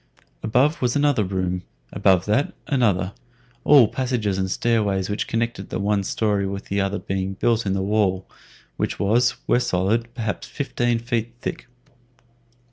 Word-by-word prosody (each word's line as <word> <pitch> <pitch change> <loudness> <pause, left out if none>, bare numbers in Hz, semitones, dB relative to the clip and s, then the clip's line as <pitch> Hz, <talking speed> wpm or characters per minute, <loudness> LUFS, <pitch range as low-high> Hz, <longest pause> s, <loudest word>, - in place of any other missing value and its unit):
Above 130 +8 +2
was 125 -1 +1
another 145 -6 +3
room; 90 -1 -2 0.3
above 95 -2 +3
that, 110 +7 0
another; 100 -8 +1 0.5
all 145 -3 +7
the 105 - -6
passages 115 -7 -1
and 95 0 -1
stairways 105 -3 0
which 105 - -2
connected 115 -4 -2
the - - -3
one 100 0 +1
story 100 -1 0
with 100 +1 -5
the 100 0 +1
other 100 +1 -1
being 95 0 -3
built 115 +1 +1
in 95 - +1
the 95 0 -1
wall, 95 -2 +1 0.5
which - - -2
was, 120 +5 +2
where - - +3
solid, 115 +2 0
perhaps 110 -4 -3
fifteen 120 -4 -1
feet 115 0 -3
thick. - - -5
105 Hz, 155 wpm, -23 LUFS, 95-120 Hz, 0.5 s, all